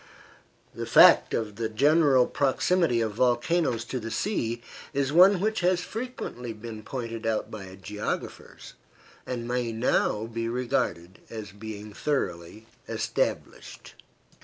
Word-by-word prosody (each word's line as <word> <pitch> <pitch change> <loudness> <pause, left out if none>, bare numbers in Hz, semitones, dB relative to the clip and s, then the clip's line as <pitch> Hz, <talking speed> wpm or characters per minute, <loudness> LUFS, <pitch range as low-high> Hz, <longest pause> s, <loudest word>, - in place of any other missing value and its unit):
The - - -5
fact - - +7
of 105 -2 -3
the 115 -1 -2
general 140 +2 +4
proximity 140 -1 +1
of 110 -1 -1
volcanoes 120 +2 +1
to 130 - -4
the 115 -1 -6
sea 120 - -2 0.3
is 140 0 0
one 185 +3 +7
which 220 +3 0
has 180 0 +2
frequently 215 - -6
been 110 0 -8
pointed 115 -2 -5
out 110 -1 -1
by 95 -3 -8
geographers, 105 +2 -6 0.5
and 120 -2 -4
may 120 -1 -1
now 110 -1 +1
be 115 0 -3
regarded 110 -7 -2
as 110 -3 -7
being 105 0 -8
thoroughly 110 - -3 0.2
established. - - -3
115 Hz, 125 wpm, -27 LUFS, 110-140 Hz, 0.5 s, fact